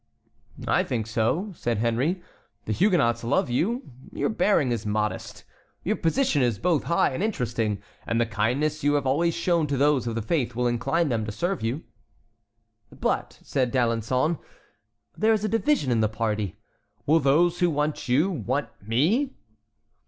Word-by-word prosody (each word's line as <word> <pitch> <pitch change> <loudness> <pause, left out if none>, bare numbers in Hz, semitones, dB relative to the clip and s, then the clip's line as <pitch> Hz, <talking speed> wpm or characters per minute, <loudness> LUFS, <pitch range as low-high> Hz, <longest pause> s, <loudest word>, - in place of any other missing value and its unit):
"I - - +3
think 115 -3 -2
so," 115 - 0
said 120 -6 -1
Henry. 125 - 0 0.4
"The 110 - -1
Huguenots 120 - +2
love 125 +1 +1
you. 225 - 0 0.3
Your - - -1
bearing 200 - +2
is 115 -3 -1
modest, 105 0 -2 0.4
your - - 0
position 165 - +2
both 170 -4 +1
high 170 - +2
and 130 - -3
interesting, 115 - -1 0.2
and 115 - +1
the 120 - +3
kindness 125 +8 -1
you 145 0 +3
have 145 -2 0
always 165 +6 +2
shown 170 -4 +1
to 140 -1 -1
those 140 -2 +2
of 115 - -2
the 115 - -2
faith 125 -2 -1
will 125 +1 0
incline 130 +7 +1
them 115 -3 0
to - - -3
serve 175 - -2
you." 120 +7 -2 1.1
"But," - - -2
said 130 -3 0
D'Alençon, 125 +5 +1 0.8
"there 220 +1 +3
is 215 -1 0
a - - +1
division 225 - +1
in 115 - +2
the 110 - +2
party. 105 -3 -2 0.5
Will 160 +3 +4
those 165 +5 +3
who 175 - +3
want 150 -3 -2
you 150 +10 +3
want 135 - -2
me?" 160 - +1
135 Hz, 160 wpm, -25 LUFS, 115-170 Hz, 1.1 s, Will